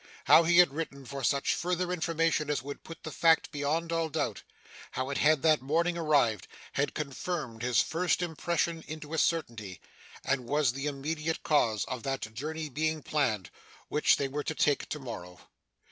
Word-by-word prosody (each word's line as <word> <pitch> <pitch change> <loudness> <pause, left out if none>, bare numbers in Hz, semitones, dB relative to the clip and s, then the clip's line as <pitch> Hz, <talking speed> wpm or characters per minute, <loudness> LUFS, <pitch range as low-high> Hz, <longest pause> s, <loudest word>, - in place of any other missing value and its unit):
How - - +8
he 170 +1 +4
had 175 -6 +7
written 140 -3 -5
for 135 +1 -6
such 140 +3 +2
further 180 +1 -1
information 165 -3 0
as 145 -3 0
would 140 +1 -7
put 165 - -11
the 155 - -5
fact 165 +3 +3
beyond 155 +3 -1
all 165 -1 0
doubt; - - -2 0.5
how 130 +1 -2
it 140 - -1
had 155 -1 +4
that 155 -2 +4
morning 165 +6 +1
arrived; 145 - +2 0.3
had 145 - -1
confirmed 140 -4 -4
his 120 -2 +3
first 180 +2 0
impression 170 0 -1
into 155 0 -7
a 160 - +1
certainty; 115 - -1 0.5
and 130 -3 0
was 145 -2 +2
the 135 +2 -3
immediate 155 +3 -3
cause 115 -9 +2
of 125 -2 -5
that 135 -4 -3
journey 155 +6 -4
being 155 +2 -1
planned, 110 - 0 0.4
which 150 - +4
they 140 - 0
were 145 +2 -3
to 160 - -3
take 145 -1 +1
to - - -3
morrow. 90 -10 -8
150 Hz, 175 wpm, -30 LUFS, 135-165 Hz, 0.5 s, How